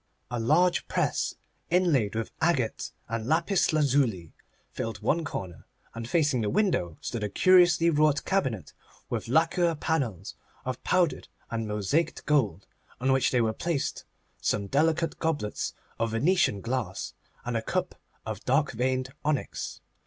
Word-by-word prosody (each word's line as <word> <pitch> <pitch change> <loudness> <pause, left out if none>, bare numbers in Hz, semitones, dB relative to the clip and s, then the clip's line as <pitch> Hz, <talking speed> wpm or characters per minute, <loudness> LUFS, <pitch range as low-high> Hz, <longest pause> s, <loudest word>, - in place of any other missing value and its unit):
A 120 - -1
large 170 +10 +3
press, - - 0 0.3
inlaid 160 - +2
with 115 0 -2
agate 150 -8 0 0.2
and 115 0 -3
lapis 170 +6 +2
lazuli, 130 - +1 0.4
filled 115 -1 -4
one 165 +2 +2
corner, 95 - -6 0.3
and 115 0 -6
facing 145 -6 +2
the 105 - 0
window 175 - +1
stood 115 -3 -4
a 105 - -1
curiously 175 - +5
wrought 150 -1 +2
cabinet 130 - -1 0.4
with - - -2
lacquer 165 +5 +2
panels 125 - -2 0.3
of 130 -1 -4
powdered 180 -4 +1 0.2
and 115 -1 -2
mosaiced 105 - -1
gold, 110 - +1 0.3
on 130 +2 +1
which 130 -1 +3
were 115 -3 +2
placed 165 +2 -2 0.4
some 100 - 0
delicate 160 +8 +1
goblets 150 -10 -2 0.2
of 115 0 +1
Venetian 130 - +2
glass, 115 -5 -3 0.3
and 120 -1 -2
a 115 - +1
cup - - -2 0.3
of 110 0 -5
dark 140 +3 +2
veined 130 +2 -1
onyx. 150 -2 -2
130 Hz, 140 wpm, -28 LUFS, 115-160 Hz, 0.4 s, curiously